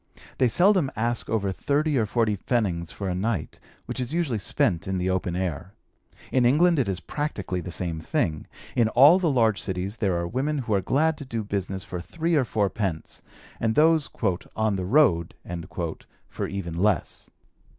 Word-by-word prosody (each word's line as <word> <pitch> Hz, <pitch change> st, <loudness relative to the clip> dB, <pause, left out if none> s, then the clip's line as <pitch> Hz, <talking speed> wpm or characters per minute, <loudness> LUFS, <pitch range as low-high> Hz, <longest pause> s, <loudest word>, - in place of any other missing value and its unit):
They 130 Hz, -, +5 dB
seldom 175 Hz, -, +3 dB
ask 120 Hz, +1 st, -1 dB
over 100 Hz, -3 st, 0 dB
thirty 145 Hz, +8 st, 0 dB
or 115 Hz, -4 st, +2 dB
forty 110 Hz, -1 st, +1 dB
pfennigs 95 Hz, -7 st, -1 dB
for 100 Hz, -, -5 dB
a 90 Hz, -, -1 dB
night, 95 Hz, -3 st, -2 dB, 0.3 s
which -, -, -5 dB
is 125 Hz, +3 st, -3 dB
usually 145 Hz, -11 st, 0 dB
spent 90 Hz, -1 st, 0 dB
in 95 Hz, -1 st, -1 dB
the 90 Hz, +1 st, 0 dB
open 90 Hz, -1 st, -1 dB
air. 90 Hz, +1 st, -3 dB, 0.6 s
In 130 Hz, -, +3 dB
England 155 Hz, +6 st, +4 dB
it 125 Hz, -, +1 dB
is 95 Hz, -2 st, -2 dB
practically 100 Hz, -, -3 dB
the 90 Hz, -, -7 dB
same 85 Hz, -1 st, -3 dB
thing. 80 Hz, -1 st, -1 dB, 0.3 s
In 115 Hz, -2 st, +3 dB
all 145 Hz, +10 st, +7 dB
the 175 Hz, -3 st, +1 dB
large 115 Hz, -6 st, +2 dB
cities 95 Hz, +3 st, -3 dB
there 95 Hz, -5 st, 0 dB
are 85 Hz, 0 st, -2 dB
women 140 Hz, -, -1 dB
who 120 Hz, -5 st, -2 dB
are 100 Hz, -, +2 dB
glad 150 Hz, -, +1 dB
to -, -, -6 dB
do 115 Hz, -4 st, -3 dB
business 95 Hz, -2 st, -3 dB
for 90 Hz, -, -6 dB
three 165 Hz, -, -2 dB
or 145 Hz, -5 st, +3 dB
four 105 Hz, -3 st, +1 dB
pence, 95 Hz, -6 st, -4 dB, 0.4 s
and 110 Hz, -1 st, 0 dB
those 160 Hz, -1 st, +4 dB, 0.5 s
"on 110 Hz, -2 st, +1 dB
the 95 Hz, -1 st, -3 dB
road" 95 Hz, -, +3 dB, 0.9 s
for -, -, -4 dB
even 95 Hz, -4 st, -5 dB
less. 95 Hz, 0 st, -1 dB
110 Hz, 180 wpm, -25 LUFS, 95-135 Hz, 0.9 s, all